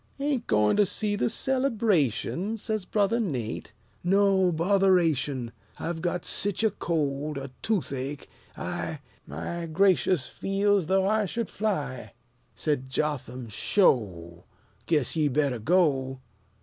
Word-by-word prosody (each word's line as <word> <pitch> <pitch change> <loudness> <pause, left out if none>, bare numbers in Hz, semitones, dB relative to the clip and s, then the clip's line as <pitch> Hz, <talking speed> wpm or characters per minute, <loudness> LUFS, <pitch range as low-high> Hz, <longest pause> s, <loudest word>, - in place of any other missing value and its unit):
"Ain't 275 -4 -1
goin' 105 - +3
to 205 - +5
see 210 +2 -1
the 205 - +1
celebration?" 220 - 0
Says 215 -2 -3
Brother 210 +4 +1
Nate. 125 - -3 0.3
"No; 190 0 +3
botheration! 165 - +2 0.3
I've 165 -1 -4
got 175 0 -2
sich 205 +1 0
a 220 - +3
cold 150 -5 -2
a 135 -1 -6
toothache 145 -9 -2 0.3
I - - -4 0.3
My 165 - -5
gracious! 180 -3 +3
feel's 195 -2 0
though 190 +1 +2
I 215 0 +2
should 230 +4 -3
fly!" 185 -11 -3 0.4
Said 145 -4 -1
Jotham, 130 -4 -2
"'Sho! 95 - +1 0.4
Guess 150 -5 +1
ye 155 -2 +2
better 140 -3 0
go." 135 - +2
170 Hz, 120 wpm, -27 LUFS, 135-200 Hz, 0.4 s, to